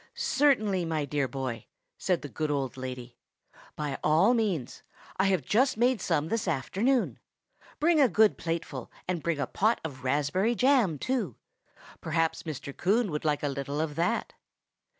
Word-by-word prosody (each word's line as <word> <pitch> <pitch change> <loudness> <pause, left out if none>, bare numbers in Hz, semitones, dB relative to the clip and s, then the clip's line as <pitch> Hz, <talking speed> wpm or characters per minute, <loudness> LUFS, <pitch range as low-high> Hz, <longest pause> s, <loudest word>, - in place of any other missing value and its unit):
"Certainly, 215 -11 +2
my 155 -3 -1
dear 140 -1 -1
boy," 125 -3 -5 0.3
said 180 -4 -1
the - - -4
good 155 +3 -3
old 140 -3 -1
lady; 125 -2 -7 0.6
"by 145 -3 -3
all 165 +10 +4
means. 195 - -1 0.4
I 190 - +3
have 190 -6 +2
just 255 - +2
made 245 -2 +2
some 160 -3 0
this 225 0 -1
afternoon. 215 - 0 0.6
Bring 315 0 +4
a 265 - +5
good 220 -1 +4
plateful, 165 -6 -4 0.2
and 175 -3 -1
bring 170 -1 -1
a 140 - 0
pot 220 +4 +1
of 135 -5 -7
raspberry 150 - +1
jam, 250 - +3
too. 260 - -2 0.7
Perhaps 165 0 0
Mr. 140 -1 -6
Coon 205 +2 +1
would 150 - -3
like 150 -1 +1
a - - +1
little 140 +1 -3
of 155 -1 -1
that." 175 +9 -1
165 Hz, 160 wpm, -28 LUFS, 145-220 Hz, 0.7 s, a